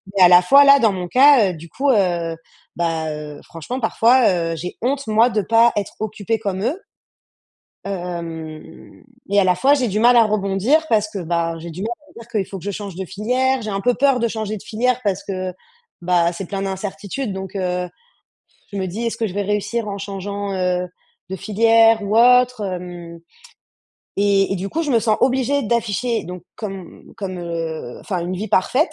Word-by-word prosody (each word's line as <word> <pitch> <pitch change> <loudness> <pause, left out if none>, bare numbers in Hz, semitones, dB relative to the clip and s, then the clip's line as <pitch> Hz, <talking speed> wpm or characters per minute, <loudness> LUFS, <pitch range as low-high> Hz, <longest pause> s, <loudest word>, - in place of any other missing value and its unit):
Mais 190 - +5
à 180 - +8
la 175 0 +8
fois 275 +11 +6
là, 280 0 +7
dans 225 -5 +3
mon 180 -2 -5
cas, 260 -6 +6
heu, - - -7
du 165 +1 -11
coup, 275 - -1
heu, 175 -6 0 0.4
bah 165 -2 -1
heu, 150 -1 -8
franchement 240 - -7
parfois, 235 +2 +4 0.2
heu, - - -4
j'ai 180 +3 -7
honte 275 +2 -1
moi 220 +3 +4
de 220 -3 0
pas 230 +3 +4
être 205 -2 -2
occupée 215 +1 -2
comme 195 -2 -3
eux. 300 - -1 1.1
Hem 170 -4 -7 0.2
et 200 0 +3
à - - +2
la 180 -1 +3
fois, 270 +11 +3
j'ai 255 -4 0
du 210 +1 -1
mal 240 +2 +5
à 230 - +7
rebondir 215 - +1
parce 215 -2 +2
que, 205 - -6
bah, 170 -1 -1
j'ai 170 +1 -8
du 175 +4 -7
mal 225 - -2 0.2
à - - -21
me - - -12
dire 230 - -13
qu'il 210 -6 -2
faut 195 - -7
que 180 - -13
je 205 - -2
change 200 -1 -6
de 190 - -4
filière. 250 +8 0
J'ai 215 - -4
un 195 0 -2
peu 245 +4 +2
peur 270 -1 +2
de 235 - +1
changer 215 -1 -4
de - - -10
filière 250 +3 -1
parce 195 -2 -1
que, 185 -2 -4 0.5
bah, 175 -1 +2
c'est 175 +1 -6
plein 195 +1 -4
d'incertitudes 200 +4 -4
donc 190 +1 -7
heu, 180 -1 -2 0.8
je - - -5
me 190 - -2
dis: 210 +7 -4
«Est-ce 230 - -2
que 225 - -1
je 185 - -9
vais 205 - -1
réussir 210 +3 -2
en 200 0 -4
changeant, 200 0 -5
heu, 180 -1 -1 0.4
de 190 - -3
filière 225 +2 +4
ou 205 +2 -1
autre 250 -1 +5
hem?» 175 -2 -7 1.0
et 200 -1 +2
et - - -1
du 190 +2 -4
coup, 330 +10 -2
je 295 - -2
me 235 - +4
sens 220 -1 +1
obligée 265 +2 +1
d'afficher, 235 +1 -1
donc 180 +1 -8
comme 195 -5 -9
comme, 185 -3 -5
heu 165 -6 -5
enfin 180 -4 -3
une 180 +2 -3
vie 210 +4 -4
parfaite 255 - +2
200 Hz, 210 wpm, -20 LUFS, 180-230 Hz, 1.1 s, à